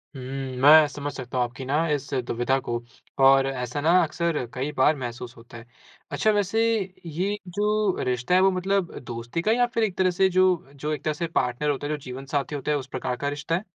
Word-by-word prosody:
हुँ, 130 - -7 0.4
मैं 150 +2 +8
समझ 145 0 -5
सकता 130 -1 -6
हूँ 125 - +3
आपकी 130 +2 -8
ना 155 +5 +1
इस 145 -1 -2
दुविधा 120 +3 0
को 120 0 0 0.5
और 135 0 +6
ऐसा 130 +1 -3
ना 165 +3 +3
अक्सर 160 -3 -1
कई 135 +4 -3
बार 150 +4 +4
महसूस 120 -1 -6
होता 120 +1 -13
है। 115 - -12 0.5
अच्छा, 215 - +2
वैसे 205 +2 +1 0.4
ये 185 +6 -2
जो 210 +1 0
रिश्ता 125 +5 -1
है 185 - +5
वो 190 0 +5
मतलब 185 0 -1
दोस्ती 120 +6 -5
का 215 - +1
है 235 - +2
या 245 - +4
फिर 230 - +1
एक 195 -4 -1
तरह 185 -1 +3
से 190 +2 +3
जो 185 +1 +4 0.3
जो 150 +2 -4
एक - - -5
तरह 155 - 0
से 165 +3 -3
पार्टनर 150 -2 -1
होता 145 0 -2
है, 150 - -1
जो - - -2
जीवन 130 +1 -7
साथी 140 +1 -2
होता 145 +2 -2
है 145 - +2
उस 135 -1 -6
प्रकार 125 -1 -3
का 145 +3 -2
रिश्ता 150 +3 -2
है? 185 - -2
145 Hz, 230 wpm, -25 LUFS, 130-180 Hz, 0.5 s, मैं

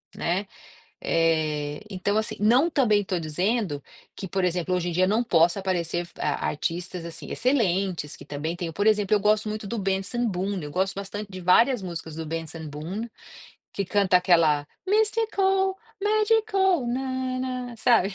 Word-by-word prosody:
né, 185 +4 -1 0.6
eh, 155 -3 +1
então 195 +2 -1
assim, 220 0 -1
não 250 +10 +4
também 215 -8 +3
estou 185 -3 -2
dizendo 175 - -1 0.3
que 190 - -5
por 190 +1 -1
exemplo 180 0 0
hoje 180 -1 -1
em - - -2
dia 185 +2 +3
não 215 +4 +2
possa 175 -5 +3
aparecer 175 -2 -1
ar - - -1
artistas 175 +3 -3
assim 170 - -8
excelentes 195 - 0
que - - -12
também 155 +4 -4
tenham, 170 -2 -4
por 205 +6 -1
exemplo 210 -2 +3
eu 205 - +3
gosto 215 +1 +2
muito 215 0 -4
do 230 +4 -3
Benson 195 +5 -1
Boom, 195 0 -2
eu 145 - -6
gosto 190 +4 0
bastante 200 +1 -6
de 185 -1 -7
várias 230 +5 +4
músicas 170 -3 -6
do 160 - -4
Benson 165 0 -5
Boom, 170 +10 -5 0.7
que 200 - -1
canta 195 -1 +3
aquela 165 -5 +3 0.2
mistical, 400 -3 +2 0.3
magical 420 - +2
nana, 255 -1 -3
sabe. 220 -4 +3
195 Hz, 160 wpm, -25 LUFS, 170-240 Hz, 0.7 s, não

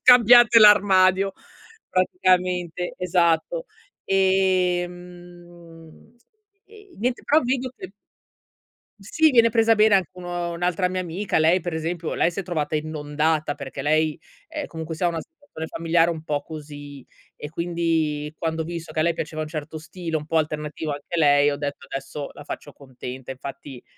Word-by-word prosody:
scambiate 240 -1 +8
l'armadio, 195 -2 +5 0.6
praticamente, 180 -1 0
esatto. 180 - +1 0.4
Ehm, 175 -1 -2 0.5
e 415 -2 -17
niente, 245 +3 -1
però 305 +2 +4
vedo 255 +1 -1
che - - -10 1.1
sì 310 +11 +2
viene 230 -3 +5
presa 225 0 +3
bene 210 -1 +5
anche 190 -5 +1
un 180 0 -11
un'altra 175 +1 -1
mia 185 0 -2
amica, 180 +4 -2
lei 165 +4 +4
per 175 -1 -5
esempio, 165 +1 -3
lei 175 - +2
si 175 - -5
è - - -3
trovata 160 -4 -3
inondata 150 0 -1
perché 140 -1 -7
lei, 155 +2 +1 0.3
ehm, 305 -2 -5
comunque 160 0 -6
sia 175 +3 0
ha - - +2
una 165 -1 -3
situazione 285 - -10
familiare 165 +1 +1
un 160 -2 -5
po' 150 -2 -2
così 145 -3 -10 0.3
e 150 - -8
quindi 165 -3 -1
quando 160 -1 -2
ho - - -4
visto 165 -1 -7
che 155 - -2
a - - +2
lei 170 - +3
piaceva 155 -1 -5
un 155 - -5
certo 155 0 -6
stile, 165 +1 -6
un 150 -1 -2
po' 160 +1 0
alternativo 150 0 -2
anche 145 +4 -6
a - - -2
lei, 145 -1 +4
ho 145 - -3
detto 145 -1 -5
adesso 140 +1 -6
la 145 - -12
faccio 145 - -7
contenta. 130 -2 -10
Infatti, 135 -1 -9
170 Hz, 160 wpm, -23 LUFS, 155-185 Hz, 1.1 s, scambiate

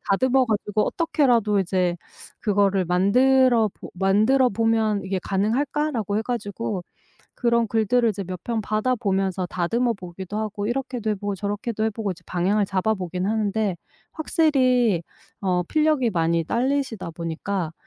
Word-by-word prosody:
다듬어 260 +6 +3
가지고 210 -1 0
어떻게라도 245 -11 +2
이제 180 -1 0 0.4
그거를 200 -2 +2
만들어 235 +6 +4
보 - - -11
만들어 215 +8 +3
보면 220 -1 +1
'이게 190 0 -2
가능할까?'라고 225 +1 0
해 - - -1
가지고 215 -4 -3 0.5
그런 235 -1 +2
글들을 230 +2 +2
이제 200 -1 -4
몇 185 -1 -7
편 230 -2 -1
받아 215 +4 0
보면서 195 -5 -1
다듬어 230 +8 0
보기도 185 +1 -8
하고 210 -1 -3
이렇게도 245 -2 -2
해 - - +1
보고 205 0 -3
저렇게도 205 +3 -3
해 220 - +1
보고 215 -1 -3
이제 180 - -7
방향을 195 +4 +1
잡아보기는 185 -2 -1
하는데 215 -3 0 0.4
확실히 255 - +2 0.4
어 180 -2 +1
필력이 305 - +2
많이 165 -2 +1
딸리시다 250 - -1
보니까 165 +1 -4
210 Hz, 340 characters per minute, -23 LUFS, 190-240 Hz, 0.5 s, 만들어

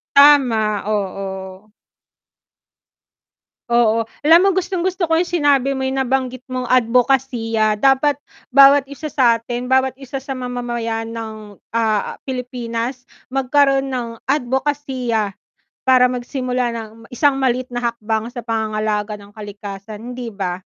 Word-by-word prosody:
Tama, 245 -8 +5
oo. 190 0 -4 2.0
Oo, 230 -1 +2 0.2
alam 325 +3 +7
mo 390 - +2
gustong-gusto 365 -1 -1
ko 325 - +4
yung 355 - 0
sinabi 285 -5 +2
mo 265 - -3
nabanggit 265 -1 -1
mong 255 -1 -3
adbokasiya, 240 -3 +2
dapat 270 +5 +3 0.3
bawat 275 +1 +6
isa 285 +2 -7
satin, 240 -1 +1
bawat 260 0 +3
isa 270 0 -6
sa 275 - -7
mamamayan 240 -3 -3
ng, 215 -3 -8 0.2
ah, 220 -3 0
Pilipinas 250 -1 -4 0.2
magkaroon 270 +1 +2
ng 235 -3 -5
adbokasiya, 260 -5 -1 0.5
para 255 -1 +5
magsimula 250 -1 -2
ng 225 -1 -6 0.2
isang 280 +3 +2
maliit 255 -1 +1
na 245 - -2
hakbang 220 -1 -3
sa 240 -1 -8
pangangalaga 215 -2 -1
ng 205 0 -15
kalikasan, 205 +2 -8
hindi 245 -1 -6
ba? 195 -4 -3
245 Hz, 115 wpm, -19 LUFS, 220-270 Hz, 2.0 s, alam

